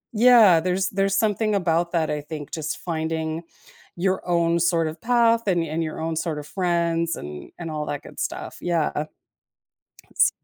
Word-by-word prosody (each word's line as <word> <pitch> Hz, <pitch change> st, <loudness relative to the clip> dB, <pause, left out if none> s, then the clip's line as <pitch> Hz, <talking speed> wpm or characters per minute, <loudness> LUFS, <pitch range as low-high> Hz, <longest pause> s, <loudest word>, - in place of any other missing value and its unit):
Yeah, 220 Hz, -7 st, +7 dB
there's 185 Hz, +2 st, 0 dB
there's 195 Hz, 0 st, 0 dB
something 215 Hz, 0 st, +1 dB
about 170 Hz, -2 st, +1 dB
that, 165 Hz, -2 st, +1 dB
I 150 Hz, -1 st, -2 dB
think 150 Hz, -1 st, -8 dB
just 155 Hz, -1 st, -3 dB
finding 160 Hz, -1 st, -3 dB, 0.5 s
your 185 Hz, +2 st, 0 dB
own 170 Hz, -1 st, +2 dB
sort 165 Hz, -1 st, +2 dB
of 160 Hz, +1 st, -9 dB
path 230 Hz, -2 st, +3 dB
and 175 Hz, -3 st, +2 dB
and 165 Hz, +1 st, -2 dB
your 155 Hz, -, -5 dB
own 160 Hz, 0 st, -2 dB
sort 160 Hz, -2 st, -2 dB
of 145 Hz, -, -8 dB
friends 170 Hz, -2 st, 0 dB
and 75 Hz, 0 st, -8 dB
and 165 Hz, -2 st, -5 dB
all 150 Hz, -1 st, -3 dB
that 145 Hz, -, -4 dB
good -, -, -12 dB
stuff. -, -, -4 dB
Yeah. 160 Hz, -3 st, 0 dB, 1.2 s
S -, -, +3 dB
170 Hz, 170 wpm, -24 LUFS, 160-190 Hz, 1.2 s, Yeah